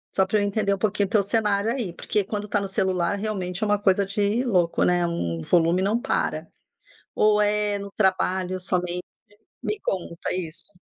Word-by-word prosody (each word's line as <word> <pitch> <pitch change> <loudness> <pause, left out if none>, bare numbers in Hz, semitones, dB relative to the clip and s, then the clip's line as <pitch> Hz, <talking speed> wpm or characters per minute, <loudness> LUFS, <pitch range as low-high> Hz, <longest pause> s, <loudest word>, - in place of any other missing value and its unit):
Só 190 - +4
pra 205 +2 +1
eu - - +1
entender 200 0 +1
um - - -1
pouquinho 200 0 0
teu 210 0 +3
cenário 210 +1 +1
aí. 235 -9 -3
Porque 210 +3 0
quando 210 +1 -4
tá 205 - +1
no 195 - -3
celular, 190 -1 0
realmente, 195 -2 -3
é 215 - +1
uma 205 - +3
coisa 200 -1 +3
de 205 +4 0
louco, 180 -9 +2
né? 175 -1 +3
Hum, 85 - -2
o - - -8
volume 170 +1 +3
não 205 +5 +1
para. 275 - -1 0.7
Ou 210 0 +4
é 210 0 +1
no 200 0 -7
trabalho 185 -2 +1
somente? 180 -1 -1 0.6
Me 425 - -2
conta 170 -3 -3
isso. 180 +2 -5
200 Hz, 185 wpm, -24 LUFS, 180-210 Hz, 0.7 s, Só